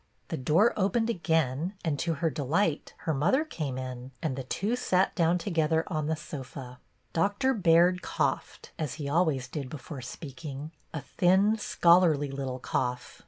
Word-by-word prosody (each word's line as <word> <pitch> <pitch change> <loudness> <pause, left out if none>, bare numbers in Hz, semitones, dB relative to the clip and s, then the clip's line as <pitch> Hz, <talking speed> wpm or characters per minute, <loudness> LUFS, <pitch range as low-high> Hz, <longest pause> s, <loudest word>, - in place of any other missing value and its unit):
The - - -2
door 160 - +3
opened 225 +4 +1
again, 165 - 0
and, 145 -4 0
to 165 +3 0
her 165 +2 0
delight, 155 +4 0
her 160 - +1
mother 175 - +2
came 145 - -4
in, 130 -1 -6
and 150 -5 -1
the 135 - -4
two 200 - -1
sat 190 -6 +2
down 170 0 +2
together 165 -3 +1
on 155 -4 -2
the 160 - +1
sofa. 135 -4 -8 0.3
Doctor 205 +9 +2
Baird 180 -3 +4
coughed, - - -2
as 155 -5 -2
he 150 -3 -5
always 145 -4 +1
did 135 0 -5
before 145 -1 -7
speak 135 +3 -9 0.3
— 155 - -35
a 155 - -3
thin, 190 +7 +3
scholarly 170 -7 +4
little 135 -2 -4
cough. 125 -1 -3
160 Hz, 165 wpm, -29 LUFS, 135-180 Hz, 0.3 s, Baird